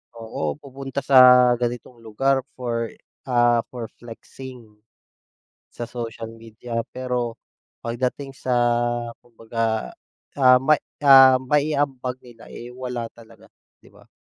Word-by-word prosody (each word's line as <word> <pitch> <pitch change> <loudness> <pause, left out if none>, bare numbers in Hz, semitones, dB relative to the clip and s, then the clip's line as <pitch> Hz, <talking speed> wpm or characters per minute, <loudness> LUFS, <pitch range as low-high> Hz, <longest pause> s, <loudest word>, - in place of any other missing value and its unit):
Oo, 110 -10 -4
pupunta 135 0 -6
sa 125 -2 +7
ganitong 120 0 -4
lugar 130 +5 0 0.2
for, 120 -2 -3 0.4
ah, 120 -2 +3
for 120 -3 -8
flexing, 125 +2 -11 1.1
sa - - -7
social 115 -1 -7
media. 115 +1 -7 0.2
Pero, 125 -2 -3 0.5
pagdating 125 +4 -3
sa 130 -1 -3 0.7
kumbaga, 115 - -3 0.5
ah, 130 -1 +7
ma 155 +3 +3 0.2
ah, 135 -2 +8
mai-ambag 140 -2 0
nila, 120 -2 -15
eh, 120 +1 -10
wala 125 -2 -5
talaga, 115 -1 -18 0.3
'di - - -19
ba? - - -21
125 Hz, 110 wpm, -22 LUFS, 115-130 Hz, 1.1 s, ah